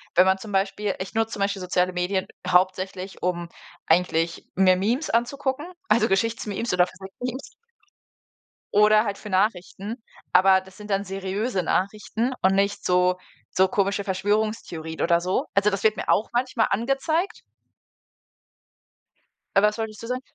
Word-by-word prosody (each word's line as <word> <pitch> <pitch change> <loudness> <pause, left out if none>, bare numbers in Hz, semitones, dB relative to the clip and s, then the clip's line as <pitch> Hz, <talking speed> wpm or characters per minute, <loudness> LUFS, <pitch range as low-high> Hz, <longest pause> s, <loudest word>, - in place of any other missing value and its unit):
wenn 180 - +7
man 190 0 +3
zum 210 +2 -9
Beispiel 195 +1 0
ich 185 - -6
nutze 225 0 0
zum 200 - -5
Beispiel 200 -1 0
soziale 180 0 0
Medien 185 +2 -1 0.2
hauptsächlich, 185 +1 0
um 175 -1 -1 0.4
eigentlich 165 0 +1
mir 185 -1 +5
Memes 240 - 0
anzugucken, 265 +5 -1 0.2
also 220 -1 +4
Geschichts-Memes 225 +2 -1
oder 180 0 +4
Physik-Memes. 210 +8 -7 1.2
Oder 215 +1 +5
halt 205 -3 -3
für 210 - -9
Nachrichten, 200 +3 -1 0.3
aber 190 +1 +6
das 190 +1 -17
sind 210 0 -10
dann 195 0 +1
seriöse 195 +2 -2
Nachrichten 215 +7 -1
und 190 +1 +3
nicht 200 +1 0
so 180 0 +3 0.4
so 190 +1 +4
komische 200 +1 0
Verschwörungstheorien 190 -5 -2
oder 170 0 +3
so. 180 +2 -1
Also, 200 +1 +4
das 195 -1 -3
wird 215 -1 +3
mir - - -4
auch 215 - +2
manchmal 240 -2 +1
angezeigt. 275 - 0 2.2
Äh, 195 - +6
was 210 +1 +2
wolltest 220 -2 -5
du - - -6
sagen? 250 +1 -2
200 Hz, 145 wpm, -24 LUFS, 185-220 Hz, 2.2 s, wenn